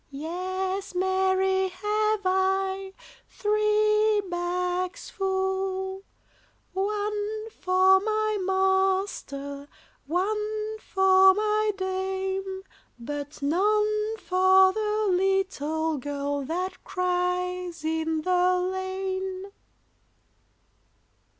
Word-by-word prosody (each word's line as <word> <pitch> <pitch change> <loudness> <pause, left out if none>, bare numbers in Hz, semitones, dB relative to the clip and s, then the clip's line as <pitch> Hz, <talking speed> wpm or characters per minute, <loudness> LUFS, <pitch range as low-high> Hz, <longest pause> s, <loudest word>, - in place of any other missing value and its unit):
Yes, 370 +6 -4
marry, 380 +1 +2
have 420 +3 0
I, 380 +1 0 0.4
Three 425 0 +2
bags 360 +1 -2
full: 380 0 -2 0.7
One 420 +2 -2
for 375 0 +4
my 430 0 0
master, 380 -7 0 0.4
One 425 +5 -2
for 380 -1 +5
my 425 0 +1
dame; 380 0 -3 0.3
But 285 +4 -6
none 425 +6 +1
for 375 -1 +4
the 430 0 0
little 340 -5 0
girl 285 +1 -3
That 360 +5 -4
cries 360 -1 -2
in 320 0 -1
the 365 0 +3
lane. 375 +1 -3
380 Hz, 75 wpm, -26 LUFS, 360-405 Hz, 0.7 s, for